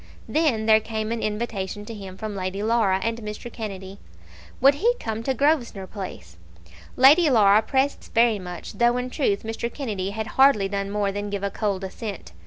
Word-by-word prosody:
Then 290 -9 +1
there 220 0 +6
came 220 0 -4
an 230 -1 -2
invitation 210 -2 -3
to 230 - -7
him 195 -3 -9
from 215 -1 -5
Lady 190 +1 -3
Laura 215 -4 +2
and 230 0 -1
Mr. 215 +2 -7
Kennedy. 195 -3 -7 0.6
Would 275 +2 +6
he 460 +12 +1
come 220 0 -4
to 265 +3 -1
Grosvenor 250 -8 +1
Place? 180 - -8 0.6
Lady 295 +6 +6
Laura 210 -4 +5
pressed 265 +5 0
this - - -16
very 230 -2 +3
much, 180 +1 -8
though 240 +3 +2
in 250 0 -3
truth 210 -10 0
Mr. 225 +1 -4
Kennedy 210 -10 -3
had 220 +2 -4 0.2
hardly 235 -8 +5
done 200 0 -3
more 205 -1 0
than 205 +1 -4
give 200 -1 -4
a 200 - -1
cold 200 -3 -2
assent. 195 - -7
215 Hz, 190 wpm, -24 LUFS, 200-235 Hz, 0.6 s, there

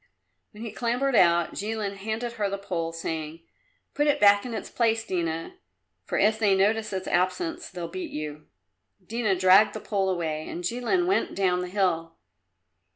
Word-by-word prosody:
When 215 +1 -11
he 230 - -5
clambered 245 +4 0
out 170 -3 +4
Jilin 210 -1 -3
handed 220 +4 -3
her 210 -3 -1
the 200 - -3
pole, 170 -4 -3
saying, 160 -1 -5 0.5
"Put 295 +1 +1
it 290 - +2
back 205 +2 +5
in 235 - -5
its - - -5
place, 225 -1 +1
Dina, 165 -4 -3 0.5
for - - -2
if 215 +2 +3
they 205 -3 +4
notice 215 +3 +1
its 190 -1 -4
absence 330 - -1
they'll 175 -2 -6
beat 185 +2 -6
you." 150 0 -6 0.6
Dina 220 -1 0
dragged 190 +3 +6
the - - -3
pole 195 -3 -1
away, 160 -4 -2
and 175 - -6
Jilin 245 - 0
went 385 +2 0
down 185 -2 +1
the 180 - -4
hill. 170 -4 0
195 Hz, 170 wpm, -26 LUFS, 175-225 Hz, 0.6 s, dragged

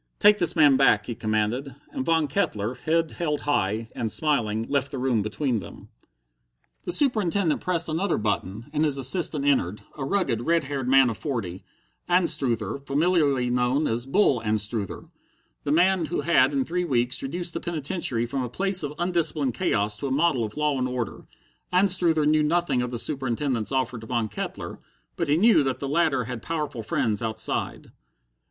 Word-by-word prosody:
"Take 210 0 +5
this 175 - +3
man 145 -5 +5
back," 110 -6 +4
he 120 - -4
commanded, 110 +4 -2 0.2
and - - -3
Von 165 +1 +2
Kettler, 120 - -1
head 160 +4 0
held 150 -4 -2
high, 110 -5 0
and 115 -2 -2
smiling, 115 -8 +1
left 140 -1 0
the 140 - -6
room 125 -4 +1
between 120 +3 -1
them. - - -12 1.0
The - - -2
Superintendent 200 - +1
pressed 170 -2 0
another 165 +5 0
button, 105 0 -2
and 150 0 +1
his 145 -3 +2
assistant 140 +2 +3
entered, 105 -8 +1
a 145 - -5
rugged, 135 - 0
red 165 -1 +3
haired 135 -2 -4
man 135 -2 +5
of 110 - -8
forty 105 - -4 0.5
Anstruther, 140 - +1
familiarly 140 -3 +1
known 125 +4 +1
as 120 +1 -1
"Bull" 140 - +2
Anstruther, 105 -1 -3 0.6
the - - 0
man 175 +1 +3
who - - -2
had 170 +4 +3
in 275 -2 0
three 180 -3 -1
weeks 125 -6 0
reduced 170 +5 -3
the - - -3
penitentiary 155 -7 -2
from 130 +3 -3
a 125 - -4
place 190 - +1
of 145 -1 -4
undisciplined 165 -6 0
chaos 105 -1 0
to 140 - -4
a - - -3
model 145 -3 +2
of 110 +3 -6
law 150 -3 0
and 130 - 0
order. 125 -3 -5 0.4
Anstruther 180 -4 +3
knew 155 +1 +3
nothing 150 -4 +1
of 125 - -2
the 120 - -4
Superintendent's 130 -3 -1
offer 130 -3 -1
to 110 - -11
Von 115 -3 -1
Kettler, - - -6 0.4
but 170 - -2
he 145 +2 +3
knew 220 -1 +5
that 135 -3 -1
the 140 - -5
latter 145 -3 +1
had 120 -1 -6
powerful 150 -6 -3
friends 105 -1 -1
outside. 110 -1 -3
140 Hz, 175 wpm, -25 LUFS, 120-165 Hz, 1.0 s, Take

